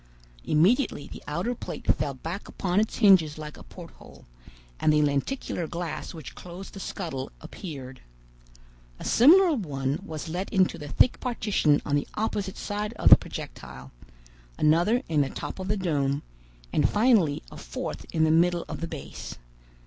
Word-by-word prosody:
Immediately 180 - +2
the - - -9
outer 175 +11 -1
plate - - -7
fell 140 -2 -3
back 165 +9 -6
upon 185 +1 0
its 215 - 0
hinges 185 -9 +5
like 150 -1 -7
a - - -13
porthole, - - -13 0.5
and 155 - +3
the 150 0 +4
lenticular 155 - -1
glass 170 0 -5
which 155 -9 -9
closed 180 +2 -10
the 195 - -8
scuttle 160 -9 -5
appeared. 140 -6 -8 1.0
A - - -9
similar 335 +8 +6
one 140 - -2
was 155 0 -6
let 180 +4 -3
into 185 -2 +2
the 150 - -7
thick 240 - +3
partition 210 - +1
on 145 - +1
the 145 - 0
opposite 205 -3 -2
side 210 +2 -3
of 225 - +2
the - - +14
projectile, 65 0 -9 0.7
another 175 - +3
in 155 -3 +2
the 135 - 0
top - - -6
of 185 - -4
the 210 +1 0
dome, 145 -6 0 0.5
and - - +3
finally 210 - +3
a - - -10
fourth 75 +6 -5
in 160 - +2
the 160 - +4
middle 175 +1 +3
of - - -6
the 165 - -2
base. - - -8
170 Hz, 165 wpm, -27 LUFS, 145-205 Hz, 1.0 s, the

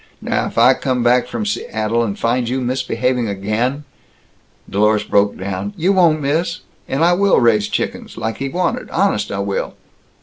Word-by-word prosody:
Now - - -1
if - - -9
I - - +6
come 130 -2 -1
back 120 +1 +3
from 115 -3 -4
Seattle 110 +2 -1
and 100 -3 -3
find 120 0 0
you 130 +2 -1
misbehaving 125 -1 -1
again 110 +8 -2 0.4
" - - -37
Dlorus 105 +2 +1
broke 100 0 +2
down. 95 +1 -4
"You 185 +5 +2
won't, 165 -5 +3
miss! 165 +5 -1 0.3
And 140 +4 0
I 175 - +4
will 200 +2 +3
raise 110 -4 +3
chickens, - - -4
like 110 0 -3
he 135 - -3
wanted, 180 +5 -2
honest 185 - 0
I 100 - -3
will!" 100 0 -3
120 Hz, 175 wpm, -18 LUFS, 105-140 Hz, 0.4 s, I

